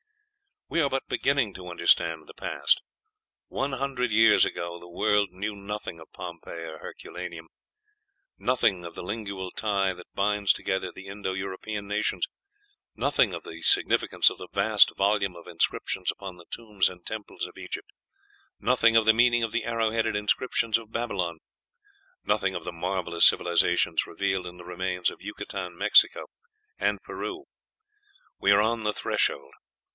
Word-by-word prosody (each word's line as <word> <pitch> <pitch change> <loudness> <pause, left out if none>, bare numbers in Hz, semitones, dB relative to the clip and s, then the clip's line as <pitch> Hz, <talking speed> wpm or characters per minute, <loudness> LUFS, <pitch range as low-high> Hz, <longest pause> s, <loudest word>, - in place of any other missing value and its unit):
We 170 - +1
are 140 - +2
but 135 0 -2
beginning 135 -7 +1
to 90 -1 -9
understand 85 -2 +2
the - - -13
past: - - +1 0.7
one 135 +1 -2
hundred 135 -2 -1
years 110 0 +6
ago 85 0 -4
the 85 - -13
world 105 +2 +2
knew 105 +4 -4
nothing 100 -3 -6
of 80 - -14
Pompeii 85 -1 -8
or 80 -1 -8
Herculaneum; 85 -2 -8 0.9
nothing 115 -8 +1
of 85 - -8
the - - -6
lingual 100 -2 -5
tie 100 -3 0
that 90 -1 -14
binds 100 0 +3
together 95 -2 -2
the 95 - -11
Indo 100 -1 -4
European 100 +2 -5
nations; 105 +1 0 0.7
nothing 120 -4 +2
of 85 - -7
the 85 +1 -9
significance - - +4
of - - -8
the - - -8
vast - - +4
volume 100 -2 +1
of 85 - -12
inscriptions 90 +2 -1
upon 95 -2 -5
the 85 - -14
tombs 105 -4 0
and 90 -1 -13
temples 110 -1 -5
of - - -12
Egypt; - - -7 0.7
nothing 115 -2 +3
of 115 -1 +5
the 110 - +7
meaning 120 +1 +4
of 115 - -1
the 120 - -1
arrow 115 -1 0
headed 110 -1 0
inscriptions 110 +2 +1
of 110 -1 -14
Babylon; 95 -9 -2 0.8
nothing - - +1
of - - -4
the 90 - -5
marvellous 85 0 +1
civilizations 85 -1 +3
revealed 95 -2 -1
in 90 0 -9
the 90 - -12
remains 90 0 -1
of - - -14
Yucatan, 90 -3 -6
Mexico, 105 +3 +5 0.6
and - - 0
Peru. 370 -1 -5 1.0
We 100 - +4
are 100 +1 +6
on 115 +1 +1
the 105 0 0
threshold. 70 -7 0
100 Hz, 160 wpm, -27 LUFS, 90-110 Hz, 1.0 s, the